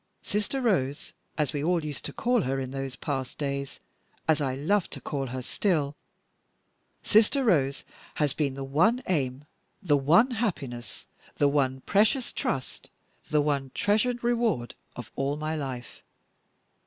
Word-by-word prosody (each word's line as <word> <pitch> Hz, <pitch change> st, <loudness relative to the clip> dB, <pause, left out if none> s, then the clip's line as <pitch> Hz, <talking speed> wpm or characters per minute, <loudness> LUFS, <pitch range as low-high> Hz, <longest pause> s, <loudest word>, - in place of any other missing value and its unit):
Sister 210 Hz, +6 st, -1 dB
Rose 145 Hz, -, 0 dB, 0.2 s
as 150 Hz, -3 st, 0 dB
we 145 Hz, -1 st, -2 dB
all 170 Hz, -1 st, +1 dB
used 145 Hz, -2 st, -5 dB
to -, -, -2 dB
call 245 Hz, 0 st, +1 dB
her 135 Hz, -3 st, -1 dB
in 130 Hz, -1 st, -4 dB
those 135 Hz, -1 st, -4 dB
past 135 Hz, -1 st, -4 dB
days, 140 Hz, -1 st, -3 dB, 0.5 s
as 160 Hz, -1 st, +3 dB
I 130 Hz, -2 st, 0 dB
love 175 Hz, +8 st, +1 dB
to -, -, -5 dB
call 140 Hz, -2 st, -3 dB
her 130 Hz, +1 st, -5 dB
still 150 Hz, -, 0 dB, 1.1 s
Sister 230 Hz, +6 st, +4 dB
Rose 140 Hz, -, +2 dB, 0.3 s
has 150 Hz, -3 st, +1 dB
been 140 Hz, -4 st, -1 dB
the 135 Hz, -, -5 dB
one 180 Hz, -, +2 dB
aim, 140 Hz, -5 st, -1 dB, 0.3 s
the 155 Hz, -8 st, +3 dB
one 170 Hz, -, +5 dB
happiness, 160 Hz, -, -3 dB, 0.3 s
the 145 Hz, -, +3 dB
one 135 Hz, -2 st, +1 dB
precious 220 Hz, -, +2 dB
trust, 130 Hz, -1 st, -3 dB, 0.4 s
the 150 Hz, -1 st, +3 dB
one 140 Hz, -2 st, 0 dB
treasured 220 Hz, +4 st, +1 dB
reward, 235 Hz, -, +1 dB, 0.2 s
of 120 Hz, -3 st, -8 dB
all 140 Hz, +2 st, -1 dB
my 155 Hz, +1 st, -2 dB
life. 130 Hz, -5 st, -6 dB
145 Hz, 150 wpm, -28 LUFS, 135-205 Hz, 1.1 s, one